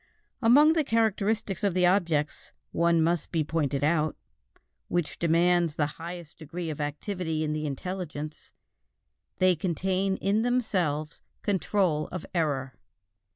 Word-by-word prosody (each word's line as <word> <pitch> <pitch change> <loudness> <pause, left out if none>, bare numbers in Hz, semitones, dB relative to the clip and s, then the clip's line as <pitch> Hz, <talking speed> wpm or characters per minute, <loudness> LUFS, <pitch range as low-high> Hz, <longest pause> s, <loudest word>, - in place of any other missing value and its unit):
Among 285 +7 +6
the 320 -2 +2
characteristics 220 - 0
of 200 -3 +1
the 180 -1 +4
objects, 170 -5 +1 0.2
one 170 -1 +3
must 170 0 0
be 160 -3 +1
pointed 145 -3 -1
out, 155 0 +2 0.7
which 175 -3 -2
demands 170 -1 +3
the 150 - +1 0.2
highest 170 -2 -8
degree 165 +1 -5
of 150 - -5
activity 160 +2 -2
in 150 -1 -1
the 155 0 -2
intelligence: 155 0 -5 0.9
they 185 -1 +4
contain 190 +3 0
in 200 +3 +1
themselves 185 -11 0 0.2
control 190 -6 +1
of 185 -2 -6
error. 140 -6 0
170 Hz, 125 wpm, -28 LUFS, 155-190 Hz, 0.9 s, Among